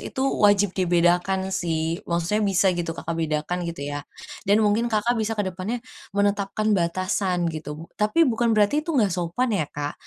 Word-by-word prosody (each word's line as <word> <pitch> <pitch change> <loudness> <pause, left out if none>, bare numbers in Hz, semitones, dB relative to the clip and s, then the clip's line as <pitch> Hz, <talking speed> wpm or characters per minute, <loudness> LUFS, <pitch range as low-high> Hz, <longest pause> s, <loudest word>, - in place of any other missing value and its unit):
Itu 265 - -6 0.2
wajib 205 -2 +4
dibedakan 180 +1 +1
sih. 165 -1 -1
Maksudnya 170 +5 0
bisa 195 -2 +2
gitu, 175 -1 -3
Kakak 165 - -4
bedakan 155 +3 -1
gitu 165 -4 -6
ya, 145 - -3 0.5
dan 205 - +6
mungkin 215 +3 +2
Kakak 225 +1 +1
bisa 220 +1 -1
ke 205 - 0
depannya 190 +6 -3 0.4
menetapkan 205 +1 +1
batasan 185 0 0
gitu. 155 0 -7 0.2
Tapi 215 +11 +4
bukan 235 -2 +1
berarti 210 +9 +3
itu 310 -2 -3
nggak 205 -7 +3
sopan 180 +8 -1
ya, 170 -8 0
Kak. 145 0 -4
190 Hz, 165 wpm, -24 LUFS, 170-210 Hz, 0.5 s, dan